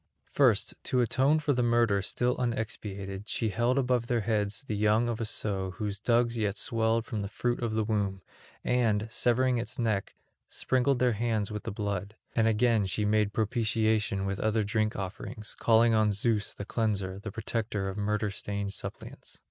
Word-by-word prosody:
First, -, -, +3 dB
to 125 Hz, -, +2 dB
atone 130 Hz, +6 st, +3 dB
for 150 Hz, -2 st, +1 dB
the 125 Hz, -, +1 dB
murder 120 Hz, -4 st, +3 dB
still 125 Hz, +5 st, 0 dB
unexpiated, 105 Hz, -4 st, -3 dB
she 115 Hz, -, 0 dB
held 120 Hz, +6 st, +1 dB
above 125 Hz, -3 st, +1 dB
their 120 Hz, -3 st, +1 dB
heads 105 Hz, +2 st, 0 dB
the 110 Hz, -6 st, -3 dB
young 105 Hz, +3 st, +3 dB
of 115 Hz, -1 st, -2 dB
a -, -, 0 dB
sow 95 Hz, -4 st, -2 dB
whose 100 Hz, -2 st, -3 dB
dugs 120 Hz, +1 st, +2 dB
yet 105 Hz, -1 st, 0 dB
swelled 115 Hz, 0 st, 0 dB
from 110 Hz, -4 st, -3 dB
the 100 Hz, -, -3 dB
fruit 120 Hz, +4 st, -2 dB
of 115 Hz, -2 st, -1 dB
the 110 Hz, -, +2 dB
womb, 100 Hz, -3 st, -1 dB, 0.4 s
and, 110 Hz, -4 st, +1 dB
severing 125 Hz, +1 st, +2 dB
its 115 Hz, -, -4 dB
neck, 110 Hz, -5 st, -1 dB, 0.3 s
sprinkled 130 Hz, +1 st, +1 dB
their 125 Hz, -1 st, +2 dB
hands 110 Hz, -2 st, -1 dB
with 105 Hz, 0 st, -5 dB
the -, -, -3 dB
blood; 100 Hz, 0 st, -3 dB, 0.2 s
and 115 Hz, -1 st, +3 dB
again 110 Hz, -2 st, +3 dB
she 105 Hz, +3 st, -1 dB
made 105 Hz, 0 st, +2 dB
propitiation 110 Hz, -2 st, +1 dB
with 100 Hz, +1 st, -2 dB
other 110 Hz, 0 st, +1 dB
drink 110 Hz, +1 st, 0 dB
offerings, 100 Hz, +2 st, -6 dB
calling 115 Hz, 0 st, +4 dB
on 110 Hz, -1 st, +3 dB
Zeus 105 Hz, +1 st, 0 dB
the 100 Hz, -, -6 dB
Cleanser, 100 Hz, -4 st, -1 dB
the 105 Hz, +1 st, -6 dB
protector 110 Hz, -2 st, -2 dB
of 95 Hz, -, -4 dB
murder 105 Hz, 0 st, -1 dB
stained 100 Hz, 0 st, -2 dB
suppliants. -, -, -5 dB
110 Hz, 180 wpm, -29 LUFS, 100-120 Hz, 0.4 s, calling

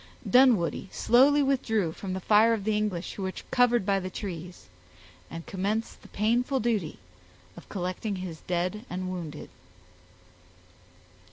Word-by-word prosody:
Dunwoodie 240 Hz, -9 st, +4 dB
slowly 280 Hz, +5 st, +4 dB
withdrew 225 Hz, -10 st, +1 dB
from 185 Hz, +3 st, -6 dB
the 190 Hz, -, -3 dB
fire 215 Hz, +4 st, +4 dB
of 215 Hz, -3 st, -2 dB
the 215 Hz, +1 st, 0 dB
English 210 Hz, -5 st, -2 dB
who -, -, -7 dB
were 190 Hz, -1 st, -2 dB, 0.2 s
covered 245 Hz, -4 st, +3 dB
by 195 Hz, -1 st, +2 dB
the 185 Hz, 0 st, -5 dB
trees, 180 Hz, -3 st, -7 dB, 0.6 s
and 165 Hz, 0 st, -8 dB
commenced 205 Hz, +4 st, -3 dB
the -, -, -14 dB
painful 240 Hz, +6 st, 0 dB
duty 215 Hz, -9 st, -1 dB, 0.6 s
of -, -, -13 dB
collecting 185 Hz, +2 st, -3 dB
his 180 Hz, -4 st, -7 dB
dead 180 Hz, +4 st, -1 dB
and 185 Hz, 0 st, -4 dB
wounded. 160 Hz, -5 st, -6 dB
200 Hz, 140 wpm, -27 LUFS, 180-230 Hz, 0.6 s, Dunwoodie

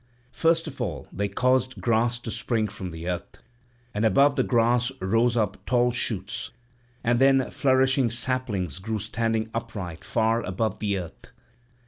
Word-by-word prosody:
First 165 Hz, +2 st, +2 dB
of 140 Hz, -5 st, -7 dB
all 85 Hz, -, -3 dB
they 100 Hz, +2 st, -1 dB
caused 130 Hz, +5 st, +1 dB
grass 115 Hz, +1 st, +1 dB
to 115 Hz, -, -5 dB
spring 115 Hz, -1 st, -1 dB
from 100 Hz, -3 st, -7 dB
the 80 Hz, 0 st, -7 dB
earth; 90 Hz, -1 st, -4 dB, 0.6 s
and 105 Hz, -, -1 dB
above 140 Hz, +7 st, +4 dB
the -, -, +2 dB
grass 120 Hz, +1 st, +2 dB
rose 115 Hz, +5 st, +2 dB
up 105 Hz, -3 st, -1 dB
tall 125 Hz, 0 st, +3 dB
shoots, 110 Hz, -4 st, -1 dB, 0.5 s
and 120 Hz, 0 st, +2 dB
then 135 Hz, -1 st, +4 dB
flourishing 130 Hz, -2 st, +3 dB
saplings 115 Hz, -, -1 dB
grew 110 Hz, +3 st, -3 dB
standing 110 Hz, +1 st, -1 dB
upright 90 Hz, -7 st, -5 dB
far 115 Hz, 0 st, +1 dB
above 110 Hz, +2 st, -2 dB
the 100 Hz, -2 st, 0 dB
earth. 90 Hz, -3 st, -8 dB
115 Hz, 150 wpm, -26 LUFS, 100-125 Hz, 0.6 s, above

